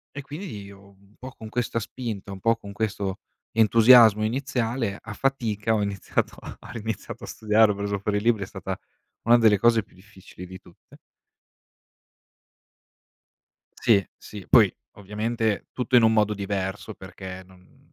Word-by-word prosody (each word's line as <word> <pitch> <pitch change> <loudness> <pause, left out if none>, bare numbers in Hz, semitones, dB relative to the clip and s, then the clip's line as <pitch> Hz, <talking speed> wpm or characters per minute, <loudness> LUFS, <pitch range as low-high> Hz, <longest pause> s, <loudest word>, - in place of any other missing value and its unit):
e 140 - -5
quindi 145 - -8
io, 100 0 -14
un 100 +2 -25
po' 130 +1 -9
con 110 - -11
questa 115 +1 -2
spinta, 110 -4 -6
un 95 - -10
po' 115 +2 +2
con 100 -2 -10
questo 100 -2 -3 0.3
entusiasmo 115 -1 +6
iniziale, 120 -3 -2
a 115 - -8
fatica, 115 -4 -1
ho 110 - +1
iniziato 100 -2 -2
a - - -9
ha - - -12
riniziato 110 -3 -6
a - - -7
studiare, 110 0 +3
ho - - -3
preso 100 0 -2
fuori 105 +1 -1
i - - -1
libri, 110 -2 +1
è - - -4
stata - - -6 0.5
una 120 +1 +6
delle 110 -3 +5
cose 115 +1 +3
più - - -25
difficili 95 -2 -13
di 95 +1 -10
tutte. 85 - -20 2.8
Sì, 100 -4 +3
sì. 100 -3 -11
Poi, - - +6 0.3
ovviamente, 105 +1 -2
tutto 125 0 -1
in 120 - +7
un 110 0 +5
modo 105 -1 +2
diverso 100 +1 -4
perché, 95 -1 -9
non 90 0 -22
105 Hz, 160 wpm, -25 LUFS, 100-115 Hz, 2.8 s, in